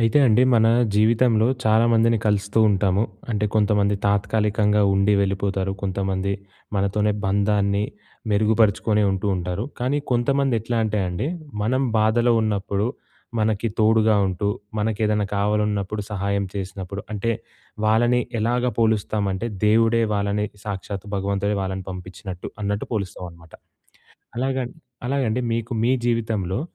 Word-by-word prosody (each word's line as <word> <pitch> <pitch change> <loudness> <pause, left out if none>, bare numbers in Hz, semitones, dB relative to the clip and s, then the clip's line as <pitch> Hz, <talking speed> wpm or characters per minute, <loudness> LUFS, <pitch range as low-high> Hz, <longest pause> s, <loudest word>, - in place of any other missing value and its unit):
అయితే 115 +4 +3
అండి 115 +1 +4
మన 110 -1 +4 0.3
జీవితంలో 110 +1 +3 0.2
చాలామందిని 115 +1 +4
కలుస్తూ 105 +1 +1
ఉంటాము. 100 0 +2 0.3
అంటే 105 -2 0
కొంతమంది 105 -1 +2
తాత్కాలికంగా 105 +1 +2
ఉండి 100 +1 +3
వెళ్ళిపోతారు. 95 0 -1
కొంతమంది 95 0 -1 0.4
మనతోనే 105 +2 +1
బంధాన్ని 100 0 +1 0.5
మెరుగుపరుచుకొని 105 0 +2
ఉంటూ, 95 +1 -2
ఉంటారు. 90 +3 -3
కానీ 130 +4 0
కొంతమంది 135 +2 +2
ఎట్లా 115 +2 -3
అంటే 105 -1 0
అండి 90 +8 -3 0.4
"మనం 130 +5 +1 0.2
బాధలో 120 +3 +3
ఉన్నప్పుడు 100 -1 -1 0.5
మనకి 110 +1 +1
తోడుగా 110 0 +4
ఉంటూ, 95 +2 -1 0.3
మనకేదన్నా 105 -1 0
కావాలన్నప్పుడు 105 0 0
సహాయం 100 0 -1
చేసినప్పుడు, 95 0 -5
అంటే 105 +2 -1 0.5
వాళ్ళని 120 +3 +3 0.2
ఎలాగా 120 +3 +1
పోలుస్తామంటే 105 -2 0 0.2
దేవుడే 115 +2 +4
వాళ్ళని 100 +1 0 0.2
సాక్షాత్తు 100 -1 -5
భగవంతుడే 100 +1 -1
వాళ్ళని 95 0 -4
పంపించినట్టు" 90 0 -8
అన్నట్టు 100 0 -2
పోలుస్తామనమాట. 85 -5 -6 0.8
అలాగన్ 130 -1 -1 0.4
అలాగండి 125 -4 0
మీకు 115 +1 -3
మీ 125 - +3
జీవితంలో, 110 -4 -1
105 Hz, 110 wpm, -23 LUFS, 100-110 Hz, 0.8 s, అండి